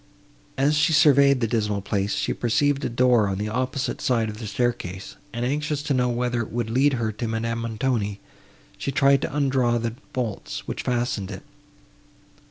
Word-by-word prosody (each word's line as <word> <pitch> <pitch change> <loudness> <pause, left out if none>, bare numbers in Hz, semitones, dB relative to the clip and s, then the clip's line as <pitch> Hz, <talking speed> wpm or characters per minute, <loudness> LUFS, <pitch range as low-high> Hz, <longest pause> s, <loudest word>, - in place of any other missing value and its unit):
As 140 +3 +3
she 155 +2 +3
surveyed 140 -3 +5
this 115 - 0
dismal 105 -4 0
place, 100 0 -1
she - - -1
perceived 140 +4 +1
a - - 0
door 120 -3 +3
on 95 -1 -2
the 105 +2 -2
opposite 130 +4 -2
side 115 -3 +1
of 105 - -10
the 110 - -5
staircase, 100 -4 -2 0.2
and, 120 +1 -3
anxious 150 +2 -1
to 150 - 0
know 125 -1 +2
whether 120 0 0
it 115 - -6
would 115 -1 -2
lead 135 +4 +3
her 115 -3 -1
to 110 +3 -4
Madame 115 +1 -2
Montoni, 115 -3 -1 0.6
she 140 - -2
tried 135 +1 +4
to - - -2
undraw 130 -4 +2
the 115 -1 -2 0.2
bolts, 120 -5 -4
which - - -3
fastened 120 -5 -1
it. - - -7
120 Hz, 180 wpm, -24 LUFS, 110-135 Hz, 0.6 s, surveyed